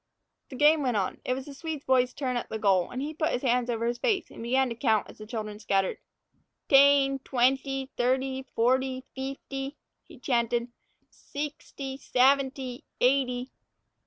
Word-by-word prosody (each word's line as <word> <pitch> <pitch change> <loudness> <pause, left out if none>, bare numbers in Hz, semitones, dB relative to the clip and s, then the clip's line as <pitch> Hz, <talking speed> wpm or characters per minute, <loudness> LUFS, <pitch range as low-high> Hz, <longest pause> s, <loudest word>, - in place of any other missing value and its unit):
The 265 - -8
game 295 +3 +5
went 250 -5 0
on. 190 -2 -2
It 255 - 0
was 265 0 -6
the 285 - -9
Swede 310 0 -6
boy's 255 -1 +3
turn 255 -2 -3
at 240 - -3
the 220 - -3
goal, 195 -4 +2
and 255 +2 -4
he 305 +2 -4
put 315 +1 0
his 250 - -2
hands 245 -1 +1
over 230 -1 -1
his 240 +1 -1
face 425 -6 0
and - - -10
began 260 +3 +2
to 230 - -4
count 225 -4 +1
as - - -14
the 215 - -9
children 215 -2 -5
scattered. 195 -2 0 0.7
"Tane, 275 0 +5
twanety, 265 +1 0
thirty, 260 +2 0
forty, 260 +2 +1
feefty," 270 +1 -5 0.3
he - - -16
chanted, 235 -1 0 0.4
"seexty, 280 -2 -6
saventy, 265 -1 +1 0.2
eighty." 250 -1 +1
260 Hz, 165 wpm, -28 LUFS, 240-275 Hz, 0.7 s, game